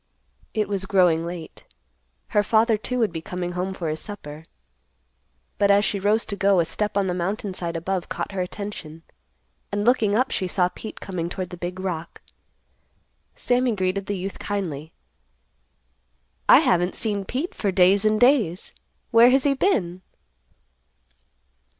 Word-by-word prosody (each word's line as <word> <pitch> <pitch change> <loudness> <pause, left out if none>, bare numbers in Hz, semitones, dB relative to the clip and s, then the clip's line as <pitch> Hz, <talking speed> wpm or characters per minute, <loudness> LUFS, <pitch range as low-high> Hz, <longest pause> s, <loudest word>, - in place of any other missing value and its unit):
It 215 -1 +1
was 195 -1 -2
growing 175 -5 +3
late. 170 -2 -8 0.7
Her 210 - +3
father, 220 +2 +3
too, 250 +4 -3
would 225 -5 +1
be 160 - -4
coming 180 +1 -4
home 180 +2 -2
for 180 -3 -4
his 155 0 -2
supper. 160 -7 -8 1.1
But 200 - +3
as 200 +1 +5
she 200 - -1
rose 210 +3 +2
to 200 - -4
go, 200 -1 +3
a 170 - +3
step 210 +4 -2
on 200 - +2
the 180 - -1
mountain 190 +3 -2
side 170 -2 -4
above 180 +2 -2
caught - - -4
her 195 -1 -2
attention, 180 -4 -6 0.7
and, 205 +1 -1
looking 225 -4 +3
up, 255 +4 +1
she 185 - -1
saw 180 0 +1
Pete 220 - -9
coming 175 -3 -4
toward 185 0 -5
the - - -6
big 180 +1 -5
rock. 170 -3 -5 1.2
Sammy 245 -2 +1
greeted 190 +1 -1
the 205 - -2
youth 190 +2 -5
kindly, 165 -7 -4 1.6
"I - - +9
haven't 180 +1 +2
seen 205 -3 -1
Pete 265 - -3
for 200 - -1
days 190 +2 +4
and 215 0 +2
days; 245 - +3 0.4
where 235 +1 +7
has 265 +1 +3
he 285 - +3
been?" 190 - 0
195 Hz, 160 wpm, -24 LUFS, 180-215 Hz, 1.6 s, I